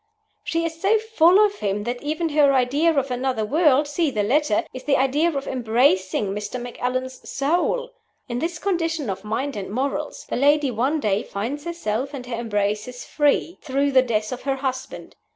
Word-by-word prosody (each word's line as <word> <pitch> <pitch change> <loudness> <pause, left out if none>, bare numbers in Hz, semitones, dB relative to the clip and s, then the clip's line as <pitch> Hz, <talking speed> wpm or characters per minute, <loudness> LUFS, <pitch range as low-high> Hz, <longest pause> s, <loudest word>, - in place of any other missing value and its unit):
She 335 0 -1
is 325 0 -5
so 420 +3 +4
full 420 -5 +4
of 410 0 -3
him 205 0 -1
that 245 +2 -4
even 315 +3 -1
her 290 -2 +4
idea 275 +6 +3
of 275 -4 0
another 250 -3 -1
world 295 +2 +3
(see 305 +2 0
the 215 -6 -1
letter) 295 +8 +2
is 255 - -8
the 280 - +3
idea 285 +5 +2
of 275 -3 -4
"embracing" 220 -5 +1
Mr. 210 +4 -4
Macallan's 255 +1 -4
"soul." 355 - 0 0.4
In 240 0 -3
this 330 +3 -2
condition 330 - -1
of 190 +1 -6
mind 255 +7 -2
and 200 -2 -5
morals, 275 +6 -3
the - - -2
lady 285 +1 +3
one 260 +7 0
day 210 -4 +1
finds 255 +10 -5
herself 280 -5 -3
and 250 -2 -7
her 245 -1 -4
embraces 210 +1 -2
free, 295 +3 +1
through 280 0 0
the 260 -1 +6
death 215 -4 -1
of 250 - -5
her 275 0 -1
husband. 260 -1 -5
270 Hz, 185 wpm, -23 LUFS, 240-310 Hz, 0.4 s, the